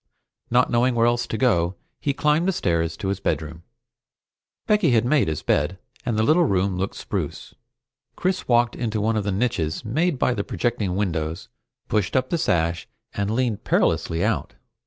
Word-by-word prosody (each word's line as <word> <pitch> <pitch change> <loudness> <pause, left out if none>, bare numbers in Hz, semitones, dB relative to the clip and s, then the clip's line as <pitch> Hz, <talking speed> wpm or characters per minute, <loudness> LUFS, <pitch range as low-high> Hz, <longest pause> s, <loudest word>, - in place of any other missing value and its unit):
Not 125 +1 +3
knowing 120 +1 +2
where 115 0 +3
else 120 0 +1
to 110 - -3
go, 95 -8 +2 0.2
he 140 - 0
climbed 150 +5 +1
the - - +3
stairs 85 - 0
to 95 - -3
his 100 0 -1
bedroom. 80 -3 -3 1.0
Becky 210 -6 +3
had 120 -2 +3
made 140 - +3
his 80 -2 -3
bed, 75 +6 +1 0.3
and 115 -3 -1
the 110 - +3
little 160 +8 +4
room 95 -5 +1
looked 95 +2 -3
spruce. - - -5 0.6
Chris 185 +1 -1
walked 120 -1 +3
into 110 -3 -2
one 110 +2 +1
of 105 -2 -1
the 100 - 0
niches 95 -5 -1
made 155 +7 0
by 125 - +2
the 100 - -2
projecting 105 -7 -1
windows, 85 -2 -2 0.4
pushed 105 -4 0
up 130 0 +1
the 170 - +1
sash, 85 - 0 0.3
and 100 0 -1
leaned 115 -2 -1
perilously 85 0 +1
out. - - -1
110 Hz, 180 wpm, -23 LUFS, 90-125 Hz, 1.0 s, little